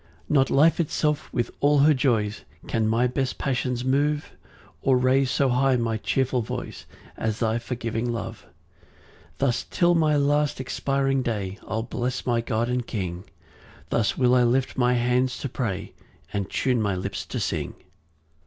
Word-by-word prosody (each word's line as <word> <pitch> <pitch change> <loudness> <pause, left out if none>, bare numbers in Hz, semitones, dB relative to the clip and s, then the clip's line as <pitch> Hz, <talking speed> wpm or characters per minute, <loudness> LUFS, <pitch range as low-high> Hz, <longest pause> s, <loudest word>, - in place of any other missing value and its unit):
5 - - -4
Not 135 -3 +4
life 155 +5 +4
itself 150 -2 0
with 120 -1 -1
all 145 +1 +4
her 150 +2 +6
joys, 115 -6 0 0.2
Can 110 -1 0
my 115 +3 +2
best 130 +1 -1
passions 125 -2 -1
move, 145 +3 +1 0.5
Or 130 -1 +3
raise 130 +1 +3
so 130 +3 +2
high 130 +1 +3
my 115 -2 0
cheerful 130 +2 0
voice 110 - -6 0.3
As 110 -1 -1
thy 115 0 0
forgiving 120 -1 -3
love. 115 -1 -5
6 - - -27 0.8
Thus 125 -3 0
till 175 0 +3
my 155 -3 +3
last 145 0 +1
expiring 135 +1 0
day 105 -5 -3
I'll 110 +1 -2
bless 125 +1 -3
my 120 -2 +1
God 115 -1 -1
and 125 -1 -2
King; 90 -4 -4 0.6
Thus 105 -3 +1
will 125 -1 +4
I 125 - +5
lift 125 +2 +1
my 125 -1 +2
hands 125 +1 +1
to - - -2
pray, 110 -6 -4 0.4
And 100 -2 -2
tune 125 -3 +1
my 100 -3 0
lips 90 - -4
to - - -3
sing. - - -2
125 Hz, 165 wpm, -25 LUFS, 115-135 Hz, 0.8 s, her